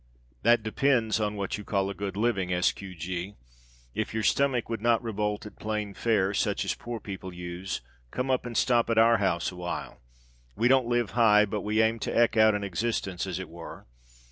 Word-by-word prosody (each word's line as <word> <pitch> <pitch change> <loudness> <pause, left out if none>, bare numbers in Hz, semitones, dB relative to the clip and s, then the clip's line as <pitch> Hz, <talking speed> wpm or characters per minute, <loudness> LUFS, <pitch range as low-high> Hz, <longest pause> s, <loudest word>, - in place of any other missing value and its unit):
That 120 -1 +4
depends 115 -1 +1
on 105 -1 -1
what 100 0 -3
you - - -7
call 100 -1 0
a - - -5
good 100 0 -5
living, 100 -5 0
S. 90 0 +3
Q. 95 -2 -10
G. 90 +4 -5 0.6
If - - -3
your 110 - -1
stomach 135 -2 +2
would 115 -2 -4
not 120 0 +2
revolt 105 -1 -2
at 105 - -11
plain 105 -1 -3
fare, 100 -3 +1
such - - 0
as - - 0
poor 120 -1 -6
people 95 -3 -7
use, 90 +1 -5 0.3
come 125 - -2
up 130 - +1
and 120 -2 -4
stop 120 -3 +3
at 115 - +1
our 115 +1 +6
house 95 -4 0
awhile. 90 -1 -6 0.5
We 120 - +2
don't 130 -1 +4
live 120 -2 0
high, 105 -3 +5
but 105 0 -3
we 110 +3 +2
aim 115 +1 +1
to 120 - +2
eke 115 - 0
out 110 -1 +5
an 100 - -2
existence, 95 -1 -2
as 90 -2 -3
it 95 -1 -5
were. 85 +1 -10
105 Hz, 205 wpm, -28 LUFS, 95-115 Hz, 0.6 s, our